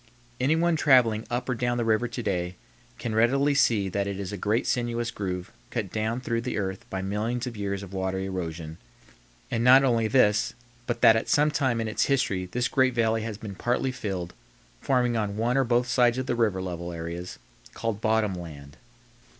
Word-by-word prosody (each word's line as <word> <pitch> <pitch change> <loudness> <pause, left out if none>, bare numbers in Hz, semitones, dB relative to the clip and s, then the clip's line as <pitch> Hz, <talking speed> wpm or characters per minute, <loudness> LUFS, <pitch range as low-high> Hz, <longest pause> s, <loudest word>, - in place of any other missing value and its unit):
Anyone 160 +6 +2
traveling 125 -7 +4
up 125 +1 -2
or 130 - 0
down 120 0 -1
the 120 - 0
river 110 +2 +2
to 120 0 -5
day 90 -2 -2 0.4
can 115 - -4
readily 135 +6 +3
see 110 -7 +3
that 100 +1 -1
it 100 -1 -4
is 100 -1 -4
a - - -4
great 105 +4 0
sinuous 120 -1 -1
groove 90 -4 -4 0.2
cut 95 -4 -3
down 110 +3 -2
through 115 -2 -1
the 125 - -3
earth 95 -2 -4
by 95 0 -3
millions 110 +5 -2
of 125 -2 -6
years 100 -1 -3
of 100 -1 -10
water 95 0 -2
erosion, 85 -4 -5 0.7
and 115 - 0
not 130 +2 +7
only 115 -4 +2
this, 110 -3 +3 0.3
but 120 - -2
that 110 - +7
at 110 - -1
some 150 +1 +3
time 130 -5 0
in 115 - -1
its 110 - +1
history 100 -9 0
this 125 0 0
great 130 -2 +2
valley 115 -1 +2
has 110 -2 -5
been 105 -2 -7
partly 120 +6 -1
filled, 95 -8 -4 0.5
forming 125 -3 +1
on 105 -2 -2
one 120 +3 +1
or 135 - +4
both 120 0 +1
sides 125 -1 +3
of 130 - -2
the 125 - -1
river 105 -6 +1
level 85 -1 -5
areas 85 +2 -6 0.4
called 115 -2 -3
bottom 110 -2 +2
land. 75 -6 -9
110 Hz, 200 wpm, -26 LUFS, 95-120 Hz, 0.7 s, not